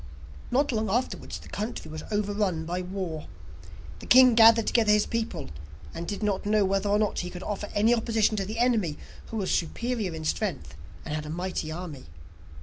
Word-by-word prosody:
Not 280 +3 +2
long 220 -2 -1
afterwards, 245 +6 -2
the - - -14
country 210 -6 -5
was 155 0 -6
overrun 205 -5 -1
by 175 +2 -2
war. 180 -4 -5 0.7
The - - -11
king 255 -1 +8
gathered 225 0 +7
together 220 -3 +3
his 210 0 +4
people, 230 - -3 0.4
and 170 0 -6
did 205 +1 -4
not 205 -2 0
know 210 -1 +2
whether 195 +1 0
or 205 - +3
not 210 -1 0
he 180 - -3
could 180 0 -8
offer 205 0 -4
any 215 +3 +4
opposition 225 -2 +1
to 195 - -1
the 215 +2 -5
enemy, 225 -10 +1 0.3
who 225 - -5
was 195 -3 -1
superior 210 +1 -1
in 160 0 -6
strength 155 - -2 0.3
and 150 - -4
had 155 0 -3
a - - -6
mighty 175 -1 -3
army. 160 -5 -7
205 Hz, 190 wpm, -27 LUFS, 175-225 Hz, 0.7 s, king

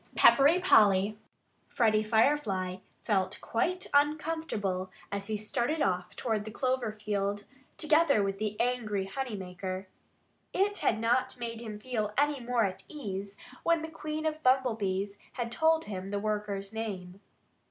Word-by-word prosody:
XI - - -29
PEPPERY 290 +6 +7
POLLY 205 - +5 0.5
Freddie 215 -3 +3
Firefly 215 -5 +1 0.3
felt 190 -3 0
quite 360 +11 -1
uncomfortable 285 - 0 0.2
as 200 0 -3
he 215 -1 -1
started 240 +8 -1
off 180 -2 -1
toward 220 -4 -1
the 215 - -7
clover 255 -1 -1
field, 205 -1 -2 0.3
together 310 -7 +4
with 195 0 -2
the 210 -1 -3
angry 225 -5 0
honey 250 +3 -4
maker. 185 0 -5 0.7
It 405 +2 +1
had 220 - +1
not 250 +3 +1
made 230 -1 -5
him 215 -3 -6
feel 215 -2 -3
any 290 0 +2
more 240 -1 +1
at 185 -1 -4
ease 200 -8 -6 0.2
when 335 -1 +2
the 320 - -4
Queen 310 -1 -4
of 315 - +2
the 310 - -16
Bumblebees 215 -8 +1 0.3
told 320 +4 +3
him 190 -2 -5
the 205 - -1
worker's 205 -1 -2
name. 195 -4 -5
215 Hz, 145 wpm, -30 LUFS, 200-275 Hz, 0.7 s, PEPPERY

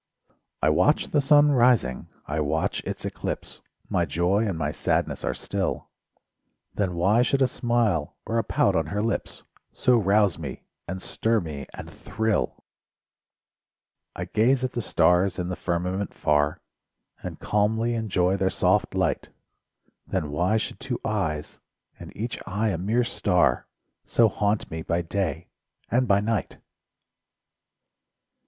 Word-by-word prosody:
I - - +5
watch 90 - +2
the 145 - +2
sun 145 +1 +5
rising, 120 - +3 0.2
I 75 +2 -2
watch 75 +1 0
its - - -5
eclipse— - - -5 0.3
My 85 - +1
joy 90 +8 +1
and 95 -5 -2
my 75 -2 -1
sadness - - -1
are - - -1
still; - - -3 0.8
Then 95 -4 -1
why 100 +7 +3
should 135 +2 +2
a - - +4
smile 120 -11 0
or 115 +1 0
a - - 0
pout - - +2
on 80 -2 +1
her 105 +6 -2
lips 115 - -3 0.3
So 125 -1 +3
rouse 100 -3 +3
me, 70 -5 -7 0.2
and 95 +1 -5
stir 115 0 +1
me, 75 -7 -6
and - - -8
thrill? 110 -1 -2 1.5
I - - -4
gaze 125 +4 +2
at 130 - -1
the 120 - -3
stars 90 0 +3
in 90 -1 -3
the 90 - -2
firmament 90 +3 -2
far 75 0 +1 0.6
And - - -7
calmly 110 +3 +1
enjoy 95 -5 +1
their 95 0 +1
soft - - +1
light. - - 0 0.8
Then 75 -2 -2
why 90 +9 +1
should 110 - -4
two 130 -2 -4
eyes, 80 -9 -2 0.4
and - - -9
each 115 +2 -3
eye 105 +4 0
a 95 - -1
mere 110 +7 +1
star, 95 -6 +1 0.4
So 115 -2 +3
haunt 105 +1 -1
me 80 0 -4
by 85 +2 -1
day 85 -1 -3 0.4
and 125 +1 +2
by 100 -1 +4
night? 110 -2 -2
100 Hz, 145 wpm, -25 LUFS, 85-115 Hz, 1.5 s, I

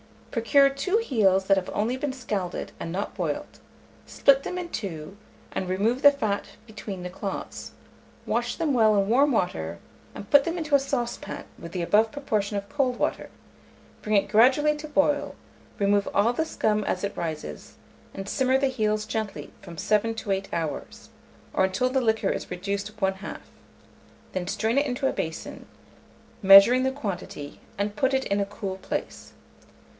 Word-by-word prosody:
Procure 275 +4 +4
2 275 +10 0
heels 200 - +2
that 195 0 +4
have 185 - -2
only 220 +5 0
been 270 0 -3
scalded, 205 -8 -4
and 165 - -5
not 195 +4 -3
boiled; - - -4 0.5
split 275 -1 +4
them 365 - -4
in 355 -1 -4
two, 190 - -6 0.3
and 185 - -3
remove 215 +8 0
the 285 - +9
fat 220 -8 -1 0.2
between 210 -4 -7
the 180 - -4
claws; 195 +2 -6 0.5
wash - - -1
them 320 -4 0
well 220 -3 +4
in 200 0 +2
warm 275 +5 +4
water, 85 - -1 0.4
and 200 - -9
put 285 -1 +7
them 335 +1 -2
into 310 -3 -4
a 280 - +7
saucepan 255 -3 -3 0.2
with 170 - -9
the 180 - -2
above 215 +5 +3
proportion 215 -8 -1
of 200 0 -5
cold 260 -4 0
water; - - -1 0.7
bring 215 0 0
it 200 - +2
gradually 260 +8 +5
to 305 +1 -7
boil, 290 -1 +1 0.4
remove 200 0 +2
all 210 +4 +4
the 320 +6 -1
scum 215 -8 0
as 185 - -2
it 200 - -2
rises, 155 - -5 0.4
and 195 0 -6
simmer 260 +4 +2
the 275 +1 +2
heels 215 -4 0
gently 220 -1 -4
from 170 - -11
7 215 +4 +1
to 215 -2 -4
8 195 0 -1
hours, 160 -3 -4 0.4
or 190 - +3
until 190 +7 0
the 265 +1 +1
liquor 220 -4 +1
is - - -3
reduced 200 +4 -4
one 190 0 +2
half; 190 +2 -8 0.9
then 185 -1 -3
strain 220 +6 0
it 285 - +3
into 265 0 -1
a - - 0
basin, 160 0 -5 0.7
measuring 195 +6 +8
the 265 - +2
quantity, 185 - -6 0.2
and 205 +1 -2
put 265 +3 +2
it 265 - +1
in 200 +1 0
a 200 - +1
cool 195 -1 -5
place. - - -5
215 Hz, 175 wpm, -26 LUFS, 195-265 Hz, 0.9 s, the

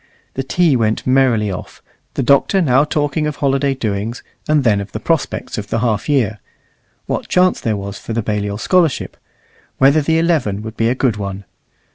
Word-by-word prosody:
The 135 - -2
tea 155 +2 +2
went 110 -2 0
merrily 130 -6 +2
off, 90 - -8 0.3
the 135 - 0
Doctor 140 +9 +3
now 135 -5 +4
talking 150 0 -1
of 150 - -3
holiday 140 -1 +1
doings, 110 -1 -3 0.2
and 150 -2 +3
then 105 -4 +2
of 100 - -9
the 110 - -3
prospects 150 -3 -2
of 100 - -6
the 115 - -1
half 110 +1 -1
year 115 -7 +1 0.7
what - - -3
chance 185 0 +2
there 110 -2 -1
was 100 0 -6
for - - -8
the 115 0 -1
Balliol 105 -1 -2
scholarship, 170 - +1 0.6
whether 140 +3 +4
the 160 +2 +1
eleven 155 - 0
would 110 +1 -7
be 115 - +1
a 125 - 0
good 125 -5 0
one. 100 -1 -5
125 Hz, 185 wpm, -18 LUFS, 105-145 Hz, 0.7 s, now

